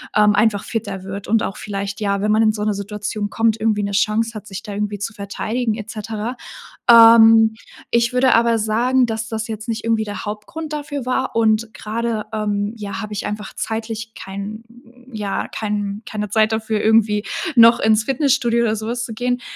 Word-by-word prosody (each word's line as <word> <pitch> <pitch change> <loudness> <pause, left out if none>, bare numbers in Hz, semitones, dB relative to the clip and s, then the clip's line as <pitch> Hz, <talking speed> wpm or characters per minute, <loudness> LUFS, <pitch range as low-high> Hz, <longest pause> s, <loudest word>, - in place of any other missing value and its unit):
ähm, 210 -1 +5
einfach 210 -1 +2
fitter 205 -5 -4
wird 195 +1 -7
und 225 +1 +2
auch - - -4
vielleicht 200 0 -5
ja, 200 -1 0
wenn 210 +1 +1
man 220 +1 +4
in 215 - +4
so 210 - -5
'ne 210 0 +1
Situation 205 +1 -4
kommt, 225 -1 +1
irgendwie 215 -1 +1
'ne 200 - -2
Chance 225 +2 +1
hat, 215 - -7
sich 195 -1 -7
da 210 - -8
irgendwie 205 -1 -3
zu 210 +3 -4
verteidigen 215 +3 -3
et 215 0 -8
cetera. 220 +2 -5 0.5
Ähm, 225 -1 +8 0.4
ich 235 +1 +2
würde 250 0 +4
aber 230 0 +3
sagen, 240 +4 +2
dass 225 -1 -4
das 220 -1 -3
jetzt 220 0 -6
nicht 225 0 -3
irgendwie 225 -1 +1
der 205 0 -6
Hauptgrund 215 +10 -6
dafür 290 -3 -4
war 255 +1 -1
und 220 0 +2
grade, 225 0 -3
ähm, 205 -1 -1
ja, 200 -1 -5
habe 215 -1 -6
ich 205 - -4
einfach 210 -1 -5
zeitlich 225 0 -4
kein 200 +3 -7 0.5
ja, 205 -2 -3
kein 205 -1 -3
keine 210 -1 -4
Zeit 215 +2 +2
dafür, 220 -1 -1
irgendwie 215 -1 +3 0.3
noch 230 0 +7
ins 220 0 +3
Fitnessstudio 250 -3 +1
oder 220 -2 +1
sowas 235 +3 -3
zu 230 - -7
gehen. 245 +2 -1
220 Hz, 190 wpm, -20 LUFS, 210-230 Hz, 0.5 s, Ähm